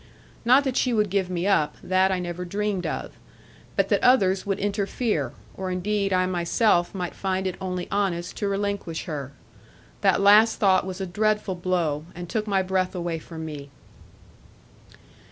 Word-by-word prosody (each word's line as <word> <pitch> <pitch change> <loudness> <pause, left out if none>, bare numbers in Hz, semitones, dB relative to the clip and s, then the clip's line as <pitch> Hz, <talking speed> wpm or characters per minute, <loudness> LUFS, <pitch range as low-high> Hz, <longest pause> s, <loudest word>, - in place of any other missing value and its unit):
Not 255 +4 +5
that 265 -2 -1
she 250 - +2
would 210 -3 +1
give 190 -2 0
me 180 0 -2
up: 175 -7 +2
that 185 +1 +2
I 190 - +1
never 175 0 -4
dreamed 200 0 -2
of. - - -4 0.6
But - - +1
that - - +2
others 195 -7 +4
would 195 -1 0
interfere; 200 - -1 0.2
or 190 -1 -4
indeed 195 +2 -1
I 185 -1 +3
myself 175 +1 +1
might 180 -2 -3
find 190 0 -2
it 185 - -1
only 180 -1 -3
honest 185 -4 -1
to 205 - -1
relinquish 200 -4 -2
her. 145 -6 -5 0.7
That - - +3
last 210 +3 +6
thought 190 -2 +3
was 190 0 -5
a - - -1
dreadful 210 +1 0
blow, 175 -4 -1
and 175 0 -7
took 215 +4 -2
my 195 -2 +2
breath 185 0 -1
away 170 -2 -2
from 160 0 -8
me. 145 -2 -7
190 Hz, 170 wpm, -25 LUFS, 175-205 Hz, 0.7 s, last